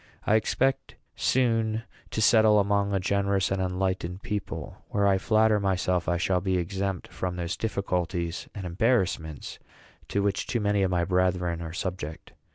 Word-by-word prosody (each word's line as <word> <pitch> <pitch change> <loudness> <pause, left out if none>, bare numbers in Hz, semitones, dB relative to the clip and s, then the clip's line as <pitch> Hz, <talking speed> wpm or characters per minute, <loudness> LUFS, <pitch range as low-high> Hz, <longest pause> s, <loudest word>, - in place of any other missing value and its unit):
I - - +3
expect 130 +4 +1 0.2
soon 115 -3 +1 0.3
to 110 - -1
settle 110 -1 +6
among 100 0 +1
a 100 - +1
generous 100 0 +1
and 95 -1 0
enlightened 95 0 -2
people, 95 -7 -5
where 100 -1 +1
I 95 -1 +4
flatter 110 +1 +3
myself 90 -3 0
I 85 - +2
shall 90 +1 +1
be 95 -2 0
exempt 95 +1 -3
from 90 +1 -3
those 85 +1 -3
difficulties 90 -5 -2
and 100 -3 -5
embarrassments 90 - 0 0.5
to 100 - 0
which 100 -2 0
too 120 - 0
many 105 -1 +1
of 95 - +2
my 90 -1 +1
brethren 90 -2 +1
are 80 -1 -5
subject. 90 -4 -5
95 Hz, 160 wpm, -27 LUFS, 90-105 Hz, 0.5 s, settle